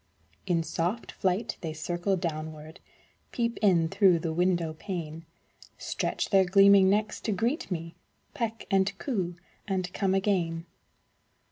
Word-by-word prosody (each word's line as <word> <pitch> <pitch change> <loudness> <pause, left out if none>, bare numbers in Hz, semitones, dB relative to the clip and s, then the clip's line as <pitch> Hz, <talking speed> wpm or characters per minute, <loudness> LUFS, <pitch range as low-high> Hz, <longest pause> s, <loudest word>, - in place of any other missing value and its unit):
In 170 -3 +1
soft 175 +8 -2
flight, 190 +5 -1
they 160 -2 -4
circle 175 +5 -1
downward, 155 -2 -5 0.5
Peep 235 -1 -1
in 175 -6 +4
through 195 -1 +4
the 160 0 -3
window 175 -2 +1
pane; 165 -2 -6 0.5
Stretch - - -2
their 195 -2 +6
gleaming 195 +1 +6
necks 210 +2 0
to 220 - -2
greet 240 - -1
me, 165 -2 -4 0.4
Peck 230 -1 -3
and 195 +1 +2
coo, 190 -10 -2 0.3
and 185 -2 -2
come 195 -2 +1
again. 175 -4 0
185 Hz, 130 wpm, -28 LUFS, 165-200 Hz, 0.5 s, their